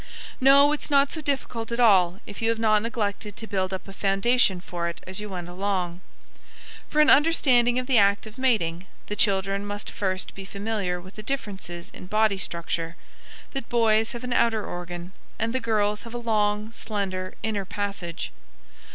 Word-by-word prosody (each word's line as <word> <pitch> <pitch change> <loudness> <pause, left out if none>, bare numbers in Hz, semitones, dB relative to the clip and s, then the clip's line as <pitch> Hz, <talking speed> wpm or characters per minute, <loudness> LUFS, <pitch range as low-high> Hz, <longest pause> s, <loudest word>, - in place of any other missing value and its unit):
No, 280 +2 +7
it's 300 - -2
not 280 -1 +4
so 315 - -2
difficult 265 -5 -3
at 235 - -2
all 190 -6 +5
if 205 - -8
you 225 - +2
have 230 - +1
not 215 -2 +3
neglected 210 -2 -3
to 225 - -6
build 190 -3 -1
up 190 +1 -5
a 195 - -9
foundation 195 +1 +2
for 175 -1 -4
it 170 - -7
as 185 +1 -2
you 210 0 -6
went 180 -3 -5
along. 180 -1 -2 0.9
For 305 - +3
an 300 - +5
understanding 255 -6 +4
of 255 - 0
the 250 -3 +4
act 200 +1 +3
of 220 +3 -11
mating, 190 -9 +1 0.2
the 210 - -4
children 195 -1 +1
must 205 0 -5
first 185 -2 -2
be 195 - -8
familiar 200 -2 -3
with 185 +3 -13
the - - -5
differences 195 -8 -5
in 180 - -10
body 215 -1 +2
structure 170 -1 -2 0.6
that 270 -4 -5
boys 225 0 +3
have 240 +1 -7
an 250 -1 -2
outer 225 -3 +2
organ, 175 0 -6 0.3
and 225 +1 -1
the 260 - +1
girls 210 -3 0
have 230 0 -9
a - - -1
long, 215 -2 0
slender 195 -5 -3
inner 215 -3 -1
passage. 195 -3 -4
210 Hz, 185 wpm, -25 LUFS, 190-230 Hz, 0.9 s, No